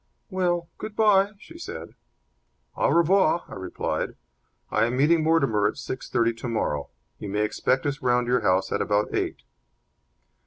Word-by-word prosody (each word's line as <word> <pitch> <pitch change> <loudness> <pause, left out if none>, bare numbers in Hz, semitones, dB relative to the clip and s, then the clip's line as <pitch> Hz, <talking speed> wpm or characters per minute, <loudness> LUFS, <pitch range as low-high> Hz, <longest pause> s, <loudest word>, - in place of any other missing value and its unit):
"Well, 175 -2 0
good 215 -1 -6
bye," 205 -2 +4
she 330 +10 -13
said. - - -7 0.8
"Au - - +2
revoir," 170 0 +3
I - - -11
replied. 95 -1 -3 0.6
"I - - +3
am 120 +2 -1
meeting 160 +4 +4
Mortimer 140 -10 +3
at 105 - -3
six 130 - -6
thirty 115 0 +2
tomorrow. 115 - -2 0.3
You 105 - -6
may 105 +2 0
expect 130 +5 0
us 145 0 -2
round 125 -1 +2
at - - -1
your 125 - +3
house 95 +1 +1
at - - 0
about 105 0 0
eight." - - -2
130 Hz, 160 wpm, -25 LUFS, 110-175 Hz, 0.8 s, bye